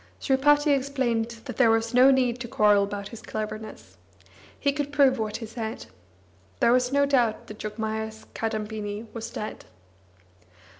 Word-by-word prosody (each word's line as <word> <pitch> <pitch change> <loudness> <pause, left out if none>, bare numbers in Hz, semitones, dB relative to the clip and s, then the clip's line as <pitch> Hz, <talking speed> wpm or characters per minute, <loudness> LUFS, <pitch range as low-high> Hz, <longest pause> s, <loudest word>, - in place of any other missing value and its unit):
Sripati 290 +2 +3
explained 260 -4 -1 0.2
that - - -7
there 245 -3 +5
was 225 +1 +1
no 255 +2 +7
need 255 -2 +2
to 240 - -5
quarrel 210 -3 +4
about 200 0 -6
his 230 - -10
cleverness. 215 - -7 0.6
He 280 - +2
could 290 0 -3
prove 275 -3 +4
what 215 -1 -2
he 225 - -7
said. 220 0 -6 0.7
There 235 - +4
was 250 0 +2
no 280 0 +3
doubt 245 -6 +1
that 210 - -11
Jogmaya's 220 0 -4
Kadambini 215 -1 -4
was 230 0 -5
dead. 215 -2 -6
230 Hz, 150 wpm, -26 LUFS, 215-265 Hz, 0.7 s, no